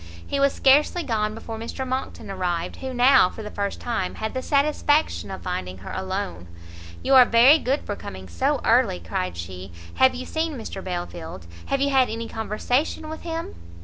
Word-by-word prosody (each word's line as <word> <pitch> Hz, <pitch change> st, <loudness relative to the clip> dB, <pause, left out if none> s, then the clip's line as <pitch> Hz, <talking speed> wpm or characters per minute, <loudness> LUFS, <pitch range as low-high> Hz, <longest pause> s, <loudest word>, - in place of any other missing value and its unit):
He 280 Hz, -, -2 dB
was 280 Hz, 0 st, +4 dB
scarcely 295 Hz, +6 st, +3 dB
gone 215 Hz, -5 st, -1 dB
before 225 Hz, 0 st, -7 dB
Mr 260 Hz, +3 st, -5 dB
Monckton 255 Hz, -5 st, -4 dB
arrived, 180 Hz, -2 st, -2 dB
who 265 Hz, 0 st, -5 dB
now 250 Hz, -6 st, +5 dB
for 220 Hz, -, -9 dB
the 210 Hz, -, -7 dB
first 200 Hz, -1 st, -3 dB
time 225 Hz, -6 st, -2 dB
had 220 Hz, 0 st, -4 dB
the 260 Hz, -, -2 dB
satisfaction 295 Hz, +2 st, +1 dB
of 190 Hz, -, -7 dB
finding 95 Hz, -, -4 dB
her 95 Hz, -, -9 dB
alone. 190 Hz, -, -4 dB, 0.6 s
"You 270 Hz, -, +2 dB
are 260 Hz, -1 st, +10 dB
very 245 Hz, +6 st, +6 dB
good 275 Hz, +2 st, 0 dB
for 205 Hz, -, -4 dB
coming 95 Hz, -, -9 dB
so 85 Hz, -1 st, 0 dB
early," 90 Hz, -, +3 dB
cried 85 Hz, +1 st, -3 dB
she; 90 Hz, +2 st, -7 dB, 0.3 s
"have 260 Hz, -1 st, +5 dB
you 255 Hz, +1 st, -5 dB
seen 315 Hz, -2 st, -2 dB
Mr 195 Hz, -4 st, -7 dB
Belfield? 175 Hz, -, -6 dB, 0.2 s
Have 275 Hz, -, 0 dB
you 280 Hz, 0 st, +2 dB
had 260 Hz, -2 st, +4 dB
any 230 Hz, +1 st, -4 dB
conversation 245 Hz, +9 st, -1 dB
with 315 Hz, -, -7 dB
him?" 330 Hz, -1 st, -5 dB
225 Hz, 185 wpm, -24 LUFS, 180-270 Hz, 0.6 s, are